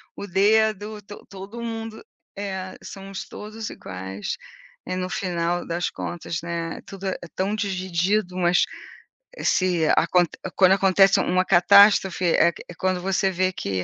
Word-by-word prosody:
o - - -6
dedo. 210 +2 +2
To 205 +1 -11
todo 200 +4 -9
mundo" 225 -1 -6 0.3
É, 190 -2 -5
somos 195 -1 -8
todos 215 +1 -7
iguais. 95 +2 -6 0.5
E, 185 - -2
no 185 0 -2
final 175 -2 -2
das 170 +1 -2
contas, 165 -2 -5
né, 170 -1 -4
tudo 195 0 -9
é 190 - -2 0.2
tão 195 +3 -1
dividido. 190 -1 -1
Mas 175 -1 +3 0.7
esse 180 - +1
acont 175 +1 +3 0.3
quando 185 -1 +5
acontece 195 0 +5
uma 185 +1 +1
catástrofe, 195 0 +5
é 170 0 +4 0.2
é - - -9
quando 185 +1 0
você 195 +1 +1
vê 185 0 0
que, 95 - -3
185 Hz, 140 wpm, -24 LUFS, 175-200 Hz, 0.7 s, quando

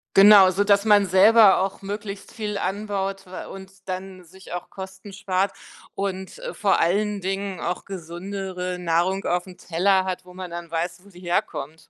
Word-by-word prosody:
Genau, 195 -1 +8
sodass 200 +2 +3
man 205 -2 +5
selber 200 +3 +7
auch 195 +1 -2
möglichst 200 0 -6
viel 210 -2 -4
anbaut 195 0 -3
wa 185 0 -8
und 190 0 -10 0.2
dann 185 0 -6
sich 185 +1 -13
auch 175 - -6
Kosten 190 +1 -9
spart 195 0 -1 0.4
und, 190 - -4
äh, - - -6
vor 200 -2 +2
allen 205 +4 +1
Dingen 195 0 -3
auch 180 +1 -3
gesündere 185 0 -5
Nahrung 180 +3 0
aufm 180 +1 -2
Teller 185 +2 +1
hat, 185 -1 -3
wo 180 0 -15
man 185 -2 -7
dann 170 0 -7
weiß, 170 +2 -3
wo 200 - -18
sie 180 - -15
herkommt. 160 -3 -2
190 Hz, 165 wpm, -24 LUFS, 180-200 Hz, 0.4 s, Genau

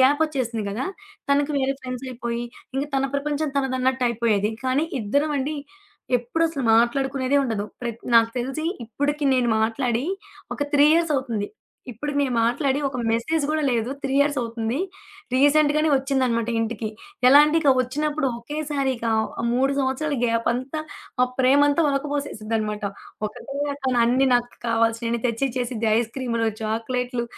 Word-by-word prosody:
గ్యాపొచ్చేసింది 265 -5 +2
కదా! 225 +6 -3 0.5
తనకి 285 +1 +2
వేరే 270 0 +1
ఫ్రెండ్స్ 255 0 -6
అయిపోయి, 235 -1 -3 0.3
ఇంక 275 - +1
తన 270 0 +2
ప్రపంచం 295 +1 -1
తనదన్నట్టు 260 -1 0
అయిపోయేది. 220 -2 +1
కానీ, 260 +5 +1
ఇద్దరం 285 +8 0
అండి, 295 +3 -2 0.6
ఎప్పుడసలు 310 +4 -1
మాట్లాడుకునేదే 265 +3 +2
ఉండదు. 220 -5 -2 0.2
ప్రత్ 235 -1 -5
నాకు 230 0 +6
తెలిసి 270 +6 -3 0.2
ఇప్పటికి 285 +6 -2
నేను 250 -2 +2
మాట్లాడి 230 +2 0 0.5
ఒక 290 - -2
3 290 0 +6
ఇయర్స్ 330 -2 +2
అవుతుంది. 235 -7 -1 0.5
ఇప్పుడికి 290 +6 -4
నేను 275 -3 0
మాట్లాడి 265 +4 +1
ఒక 270 - -6
మెసేజ్ 240 +8 0
కూడా 310 0 0
లేదు, 235 0 0
3 270 -1 -1
ఇయర్స్ 285 0 +3
అవుతుంది. 230 +2 -2 0.6
రీసెంట్‌గానే 295 +3 +4
ఒచ్చిందనమాట 260 -4 0
ఇంటికి. 225 -1 -2 0.4
ఎలా 280 +3 +9
అంటే, 300 +2 +1
ఇక 290 -3 +4
వచ్చినప్పుడు 295 +3 -1
ఒకేసారిక 275 -2 -2 0.5
3 265 +3 +2
సంవత్సరాల 275 +2 0
గ్యాప్ 230 0 0
అంతా, 260 +5 -4 0.4
మా 250 - +5 0.2
ప్రేమంతా 285 +4 +4
ఒలకపోసేసిద్దనమాట. 230 -7 -2 0.4
ఒకటే 275 +6 -8 0.2
ఎత్తున 265 -3 -2
అన్ని 255 +3 +3
నాకు 245 0 +1 0.2
కావాల్సియన్ని 230 +1 +1
తెచ్చిచ్చేసిద్ది. 240 -1 -1
ఐస్‌క్రీములు, 230 -1 -1
చాక్లెట్లు, 240 +2 -2
260 Hz, 130 wpm, -23 LUFS, 235-285 Hz, 0.6 s, ఎలా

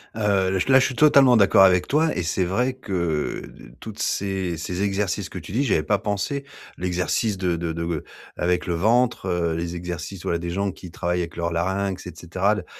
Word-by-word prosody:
Heu, 100 -3 +1
le 95 - 0
là, 130 - +8
je 130 - +3
suis 130 - -5
totalement 135 -3 +6
d'accord 100 -1 +6
avec 90 -2 +4
toi. 155 +2 +2
Et 90 - -1
c'est 85 +3 0
vrai 125 +9 0
que 85 -11 -2 0.4
toutes 110 +2 -9
ces 95 -3 -1
ces 90 +4 -4
exercices 100 -2 -1
que - - -8
tu - - -8
dis, 125 +8 +1
j'y - - +1
avais 75 - +2
pas 100 +6 +1
pensé. 110 +8 -2 0.3
L'exercice 90 +4 -1
de 90 -2 0
de 85 0 -3
de 85 +1 -4
g 80 -3 -1 0.4
avec 90 0 0
le 85 - -1
ventre, 115 +4 +2
heu, 85 -2 0
les 85 +1 -3
exercices, 90 +1 -6
voilà, 85 - -1
des 85 0 -4
gens 100 +2 -1
qui 90 0 -11
travaillent 90 +1 -2
avec 85 -1 -4
leurs 85 0 -2
larynx, 95 +2 -2
et - - -6
cetera 95 +4 0
l 105 - -4
95 Hz, 215 wpm, -23 LUFS, 85-105 Hz, 0.4 s, là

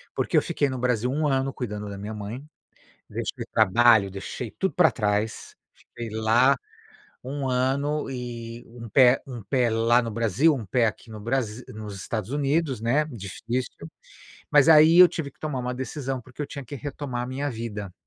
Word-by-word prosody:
porque - - +1
eu - - +6
fiquei 145 - 0
no 130 -1 -4
Brasil 125 0 0
1 150 +1 0
ano 135 0 0
cuidando 105 -4 -5
da 100 - -7
minha 105 +2 -6
mãe, 110 +6 -6 0.7
deixei - - -4
trabalho, 110 0 +5
deixei 100 +4 -6
tudo 190 - -2
pra 180 - +5
trás, 105 -1 -2 0.2
fiquei 120 -1 -9
lá 110 +5 +3 0.7
1 135 +1 -3
ano 135 +4 0
e 120 -2 -6
um 115 0 -10
pé 125 +2 +5
um 125 -5 -7
pé 120 +3 +1
lá 115 +2 +3
no 115 - -4
Brasil, 115 - +2
um 120 -6 -5
pé 120 +4 +2
aqui 110 +2 -5
no 110 -1 -8
Brasi 120 0 -2
nos 105 -2 -8
Estados 110 +2 -4
Unidos, 145 -2 0
né, 125 +7 +2
difícil. 115 +1 -5 0.6
Mas 145 +1 +5
aí 160 +2 +7
eu 180 -1 +10
tive 145 -4 -5
que - - -36
tomar 150 -4 -3
uma 125 0 -3
decisão 130 0 -4
porque 130 +4 -8
eu - - -3
tinha 140 -1 -8
que 140 - -8
retomar 140 -2 -5
a - - -4
minha 140 +3 -3
vida. 105 -5 -6
125 Hz, 185 wpm, -25 LUFS, 110-135 Hz, 0.7 s, eu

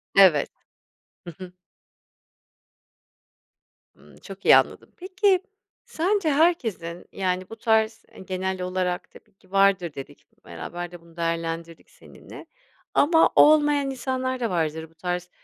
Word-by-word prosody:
Evet. 185 -7 +5 0.8
Hı 170 - -7
hı. 185 -1 -10 2.4
Imm, - - -20
çok - - -12
iyi - - +8
anladım. - - -2
Peki, 375 +1 +1 0.4
sence 390 -4 0
herkesin, 235 - 0
yani, 185 -1 -2
bu 225 - -8
tarz, 220 -1 +1
eee, - - -14
genel 190 0 -4
olarak 180 -1 -3
tabii - - -19
ki 190 -1 -28
vardır 195 -4 +2
dedik. 135 - -11 0.2
Beraber 175 0 -7
de 175 -1 -12
bunu 170 0 -21
değerlendirdik 165 0 -4
seninle. - - -14 0.5
Ama 325 +2 +4
olmayan 295 -2 +5
insanlar 260 0 -3
da 235 -3 -1
vardır 160 -2 -2
bu 165 - -28
tarz, 180 +1 -4
190 Hz, 125 wpm, -24 LUFS, 175-265 Hz, 2.4 s, iyi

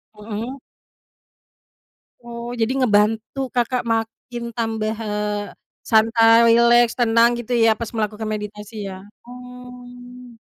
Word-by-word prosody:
Heeh. 220 +5 -6 1.7
Oh, 235 0 -7
jadi 225 +3 +1
ngebantu 220 +2 +1 0.2
Kakak 245 +1 0
makin 225 +2 -5
tambah, 220 -1 -2
eee, 210 0 -3 0.4
santai, 225 +1 +5
rileks, 235 0 +5
tenang, 230 0 +4
gitu 240 +1 -4
ya, 225 - +5
pas 230 -2 -4
melakukan 215 0 -3
meditasi 210 0 -7 0.2
ya? 190 - -8 0.3
Oh. 250 0 -12
230 Hz, 105 wpm, -21 LUFS, 215-245 Hz, 1.7 s, santai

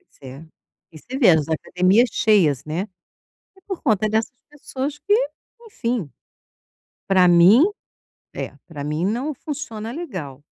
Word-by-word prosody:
Isso 370 - -32
é, 135 +4 -10 0.5
e 155 - -12
você 255 - -7
vê 235 - +6
as 160 -3 +2
academias 185 +8 +2
cheias, 195 - +2
né, 170 +7 -4 0.7
e 385 - -21
por 385 -2 -7
conta 215 -5 +1
dessas 220 +3 -1 0.2
pessoas 285 0 -5
que 410 - +1 0.5
enfim, 235 - -3 1.0
pra 185 -2 +5
mim, 175 - +7 0.7
é, - - -6
para 150 -4 -8
mim 150 +4 -2
não 250 +9 -2
funciona 245 -6 -6
legal. 185 - -7
215 Hz, 135 wpm, -21 LUFS, 165-260 Hz, 1.0 s, mim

